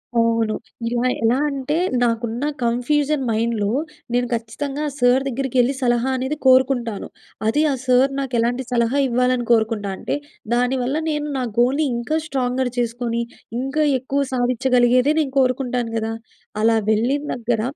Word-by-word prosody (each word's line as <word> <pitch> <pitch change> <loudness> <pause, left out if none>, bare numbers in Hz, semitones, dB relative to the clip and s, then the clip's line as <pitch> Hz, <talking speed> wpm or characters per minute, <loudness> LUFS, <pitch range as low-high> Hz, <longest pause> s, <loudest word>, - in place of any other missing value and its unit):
అవును. 230 -1 +2 0.3
ఇలా 240 +1 0 0.2
ఎలా 235 +3 +3
అంటే, 275 +2 -2 0.3
నాకున్న 235 +1 -1 0.2
కన్ఫ్యూజన్ 275 +4 +1
మైండ్‌లో 220 -2 0 0.4
నేను 245 0 +1
ఖచ్చితంగా 275 +6 -3
సార్ 245 +2 +4
దగ్గరికెళ్ళి, 260 0 +1
సలహా 240 +1 +1
అనేది 265 +4 -2
కోరుకుంటాను. 255 -4 +3 0.4
అది 295 +7 +2
ఆ - - +1
సార్ 255 +2 +4
నాకు 265 -2 -4
ఎలాంటి 245 +3 0
సలహా 235 +3 +1
ఇవ్వాలని 250 0 +1
కోరుకుంటా 220 -3 +2
అంటే, - - -2 0.4
దాని 250 +2 +2
వల్ల 265 +4 -1
నేను 300 -1 -2
నా 255 - -1
గోల్‍ని 265 +6 +3
ఇంకా 245 +7 -1
స్ట్రాంగర్ 260 -2 -1
చేసుకొని, 235 0 -1 0.4
ఇంకా 270 +4 0 0.2
ఎక్కువ 275 +2 -1
సాధించగలిగేదే 250 +2 +3
నేను 280 -4 -1
కోరుకుంటాను 250 -2 0
గదా! 225 0 -2 0.5
అలా 225 0 +4
వెళ్ళిన 245 +7 +1
దగ్గర, 235 -2 -1
245 Hz, 135 wpm, -21 LUFS, 235-265 Hz, 0.5 s, సార్